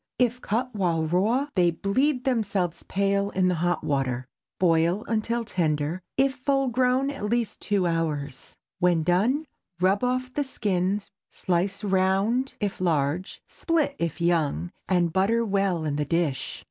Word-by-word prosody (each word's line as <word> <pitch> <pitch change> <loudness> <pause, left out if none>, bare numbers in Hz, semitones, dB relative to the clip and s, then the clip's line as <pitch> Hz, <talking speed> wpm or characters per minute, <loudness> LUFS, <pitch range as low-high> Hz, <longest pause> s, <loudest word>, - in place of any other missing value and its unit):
If 250 0 +1
cut 245 +4 -1
while 170 -6 0
raw, 215 - +1
they 180 -2 +4
bleed 250 - 0
themselves 200 -9 0
pale 200 0 +1
in 185 -2 +1
the - - +2
hot 175 0 0
water. 130 -3 -1 0.3
Boil 170 +3 +2
until 230 +1 -1
tender—if 175 - 0
full 275 0 0
grown 255 +3 +2
at 275 -7 -5
least 235 +1 -1
two 200 -3 +1
hours. 150 -5 -2 0.2
When 175 -3 +3
done, 215 - +2 0.3
rub 190 +4 +2
off 255 0 -1
the 290 - 0
skins, 200 -5 -1 0.2
slice 185 +3 -1
round 195 +6 +1
if 200 -2 -3
large, 165 +1 -1
split 315 -4 -1
if 170 0 -2
young, 155 - 0 0.2
and 175 -3 +2
butter 220 +5 +2
well 195 -5 0
in 145 -1 -1
the 150 - 0
dish. 145 -4 -1
190 Hz, 145 wpm, -26 LUFS, 170-235 Hz, 0.3 s, they